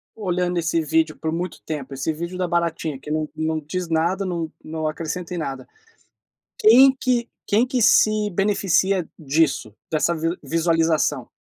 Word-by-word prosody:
olhando 180 -4 -1
esse 165 0 +1
vídeo 160 0 +1
por 160 - -3
muito 170 +2 -4
tempo, 145 -4 -5
esse 135 +4 -2
vídeo 170 +3 -5
da 185 -1 -1
baratinha, 170 -4 -1
que 150 - -8
não 155 0 -1
não 160 0 -1
diz 170 +4 -4
nada, 170 +5 +1
não 170 -3 -3
não 155 0 -3
acrescenta 165 +3 -4
em - - -4
nada. 135 -5 -5 0.9
Quem 260 +5 +7
que 245 -2 0 0.2
quem 220 +3 +3
que 255 0 -1
se 215 -1 +4
beneficia 195 -1 +1
disso, 140 -6 0 0.2
dessa 160 +1 +1
vi 165 +2 -1
visualização? 165 -4 +1
165 Hz, 160 wpm, -22 LUFS, 155-185 Hz, 0.9 s, Quem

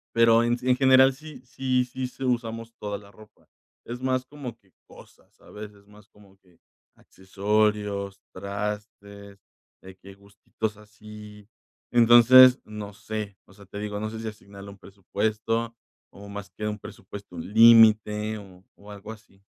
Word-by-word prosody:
Pero 115 0 +5
en 120 +1 0
en 125 0 +2
general 130 0 +5
sí 150 0 -13
sí 130 0 -1
sí 130 +1 -6
sí 130 +1 -10
usamos 115 -2 -3
toda 105 -1 -5
la 100 -1 -17
ropa. 105 +2 -20 0.3
Es 120 +1 -7
más 130 0 -1
como 135 -4 -9
que 95 -4 -33
cosas, - - -19
¿sabes?, 105 0 -12
es 100 0 -23
más 105 0 -19
como 100 -2 -22
que, 90 -3 -28 0.4
accesorios, 100 0 -2
trastes, 100 0 -7 0.4
de 95 0 -13
que 100 +1 -14
gustitos 100 +2 -7
así. 105 -1 -14 0.4
Entonces, 120 +2 +7
no 105 -1 -9
sé. 105 -1 -7
O - - -22
sea, 100 0 -17
te 100 +2 -9
digo, 105 0 -5
no 110 +1 -4
sé 110 - -7
si 115 - -6
asignarle 100 -1 -13
un 100 - -13
presupuesto 110 +4 -3 0.4
o 100 +1 -13
más 100 0 -8
que 105 +3 -7
un 105 0 -4
presupuesto, 100 -2 -11
un 85 +3 -8
límite 110 -1 +5
o 95 -3 -14
o 105 +1 -15
algo 105 +1 -10
así. 105 -3 -16
105 Hz, 160 wpm, -25 LUFS, 100-115 Hz, 0.4 s, Entonces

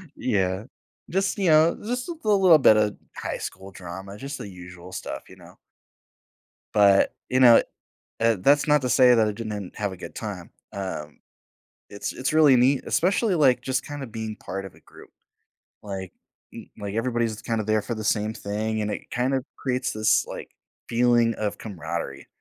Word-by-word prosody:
Yeah, 95 -2 -1 0.4
just, 195 +3 0
you 190 -4 +1
know, 155 +2 +5
just 245 +5 -3
a 345 - -3
little 190 -7 +5
bit 110 -4 +6
of 105 -1 +1 0.2
high - - -4
school 95 +1 -7
drama, 95 +2 -9
just 140 +3 -6
the - - -7
usual 90 -1 -11
stuff, 95 - -6
you - - -13
know. - - -17 1.2
But, 100 -2 +5 0.2
you 130 - +2
know, 120 -3 +8 0.6
uh, 115 -1 +3
that's 145 +9 +3
not 150 -1 +4
to 125 - -2
say 125 0 +6
that 110 -1 +3
I - - 0
didn't 105 -3 -6
have 100 -2 -2
a 95 - -9
good - - -9
time, 100 -6 -6 0.2
um, 85 -7 -6 0.7
it's 100 - -5
it's 130 +4 -2
really 150 -4 +6
neat, 130 +3 +3
especially, 195 +2 +1
like, 130 -5 +4
just 130 0 -2
kinda 145 -2 -6
being 110 -1 -5
part 95 0 -6
of 95 - -11
a - - -19
group. - - -16 0.7
Like, 95 -3 -6 0.4
m - - -10
like, 100 -1 -5
everybody's 115 -2 -1
kinda 115 -2 -2
there 110 -1 +2
for 120 - -4
the 110 - -5
same 105 +1 0
thing, 110 +1 -3
and 105 - -2
it - - -7
kind 125 +3 0
of 130 -1 0
creates 130 -1 -1
this, 110 0 +2
like, - - -8 0.4
feeling 120 -1 +3
of 105 -1 -3
camaraderie, 80 -8 -6
110 Hz, 180 wpm, -25 LUFS, 100-130 Hz, 1.2 s, know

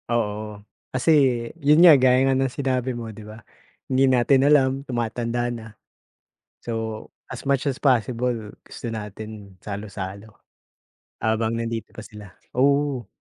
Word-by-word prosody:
Oo, 105 -2 -2 0.3
kasi 130 +5 +1 0.5
yon 150 +5 +6
nga, 170 - +10
gaya 130 +1 +4
nga 135 - +3
ng 135 0 +1
sinabi 130 -2 -2
mo, 115 -2 -6
'di 110 - -11
ba, 110 0 -11 0.5
hindi 130 +1 +4
natin 130 +1 +4
alam 145 -3 +5 0.2
tumatanda 120 0 -2
na 115 -1 -8 0.9
so, 110 -2 -4 0.2
as 130 +1 -8
much 140 -1 +1
as 130 - -6
possible 125 -2 +1 0.3
gusto - - -9
natin 105 -2 -8
salu-salo 100 0 -7 0.9
habang 110 +1 0
nandito 115 -1 -4
pa 110 - -8
sila, 105 -4 -12 0.2
oo. 140 -3 +2
120 Hz, 130 wpm, -23 LUFS, 110-130 Hz, 0.9 s, nga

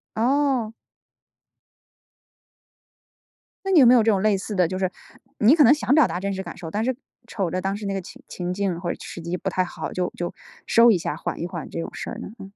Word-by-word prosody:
哦。 255 -1 +1 2.9
那 390 - 0
你 340 - +6
有 260 - +8
没 245 - +7
有 235 -3 +5
这 225 - +4
种 195 -2 +1
类 210 -2 +3
似 205 +2 -5
的 180 -3 +3
就 185 +2 -4
是 185 -1 0 0.5
你 235 +9 +6
可 305 - +6
能 255 - +7
想 290 -3 0
表 305 -5 +6
达 180 - -3
真 200 +1 -2
实 190 - -4
感 175 - -9
受， 160 -2 -7
但 215 +2 -1
是 255 0 0 0.3
瞅 195 -7 -2
着 185 - -1
当 195 +1 -1
时 210 - -7
那 195 - -2
个 195 - -2
情 260 +9 -13
情 180 0 -4
境 190 -3 -1
或 175 -1 -2
者 - - -4
时 170 - -8
机 170 +2 -3
不 190 - -3
太 185 0 +1
好， 180 - -6
就 180 -1 -2
就 175 0 -3 0.3
收 230 0 +6
一 190 - +3
下 165 - -3
缓 - - -5
一 170 - -2
缓 170 -3 -7
这 - - -5
种 - - -4
事 - - -6
儿 - - -6
呢？ - - -7
嗯。 - - -8
195 Hz, 265 characters per minute, -23 LUFS, 180-235 Hz, 2.9 s, 有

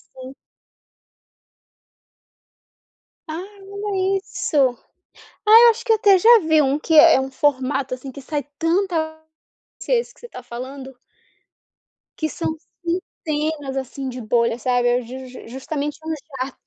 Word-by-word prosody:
Sim. 260 +1 -10 2.9
Ah. 320 +3 -5 0.2
Olha 395 -1 -1
isso. 350 -5 -4 0.9
Ah, 440 +2 +9
eu 470 - +9
acho 465 +1 -4
que 465 - +3
eu - - +5
até 400 -3 +5
já 465 +5 +7
vi 315 -3 +3
um, 275 +1 +1
que 320 +1 -1
é 320 +2 +8
é 265 - +2
um 265 - -4
formato, 265 -1 0
assim, 260 +1 -9
que 280 - -9
sai 290 +2 -3 0.2
tanta 330 -2 0 0.6
se - - -4
é - - +5
esse - - -4
que - - -25
você 480 - -10
tá 250 - -10
falando. 260 +2 -8 1.2
Que 315 - -1
são 320 +1 -3 0.7
centenas, 300 -3 -2
assim, 270 +1 -5
de 250 0 -7
bolha, 235 +1 +1
sabe. 245 0 +1
É 245 +1 +2
ju 255 +2 -9
jus 250 -2 -12
justamente 285 +3 -4
um 320 - -2 0.3
jato. 270 - -10
295 Hz, 150 wpm, -21 LUFS, 260-345 Hz, 2.9 s, Ah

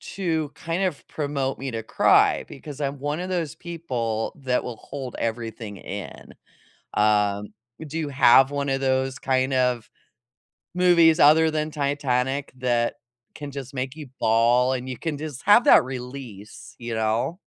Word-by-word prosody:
To 160 -6 -1
kind 170 +3 -2
of 180 -7 -3
promote 140 -3 -2
me 135 0 -5
to 115 -1 -3
cry, 110 - +3
because 145 +1 -9
I'm 140 0 -2
one 145 +3 -2
of 185 - -5
those 170 -6 -2
people 125 - -3
that 125 -1 +1
will 125 - -5
hold 130 0 -7
everything 115 -2 -4
in. 100 +2 -8 0.6
Um, 105 -1 +1 0.3
do 160 +3 -5
you 155 -3 -2
have 135 0 +5
one 140 0 -2
of 135 0 -1
those 130 0 0
kind 130 -1 0
of 125 -3 +1 0.8
movies 175 -2 +5
other 160 +2 +6
than 155 0 -1
Titanic 140 -2 -1
that 120 -2 +1 0.4
can 145 -2 -7
just 135 -1 -7
make 130 +1 -4
you 150 -3 -8
bawl, 120 +3 +3
and 130 0 -4
you 130 -2 -5
can 160 -3 -3
just 145 -3 -7
have 210 +4 +6
that - - +7
release, 125 -5 -9
you 120 -1 -4
know? 110 +10 -1
135 Hz, 160 wpm, -24 LUFS, 120-150 Hz, 0.8 s, that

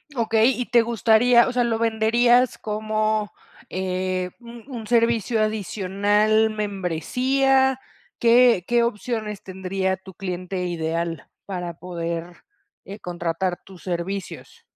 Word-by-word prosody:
Okey, 225 +1 +3
y - - -1
te 240 -1 +4
gustaría 235 +2 +4
o - - -2
sea, 245 -1 +2
¿lo 225 -1 0
venderías 235 +2 +3
como, 215 0 -1 0.4
eh, 185 0 -2
un 235 -1 -12
un 230 -5 -7
servicio 230 -1 +2
adicional, 210 +1 +1
membresía? 250 - +1 0.4
¿Qué 235 -4 +5
qué 240 0 +2
opciones 215 -2 -3
tendría 190 0 -2
tu 190 0 -13
cliente 180 0 -4
ideal 165 -1 -3 0.2
para 180 -3 -5
poder, 170 0 -5 0.5
eh, 200 +2 -9
contratar 175 +1 -3
tus 190 -2 -14
servicios? 190 - -5
210 Hz, 115 wpm, -23 LUFS, 185-235 Hz, 0.5 s, Qué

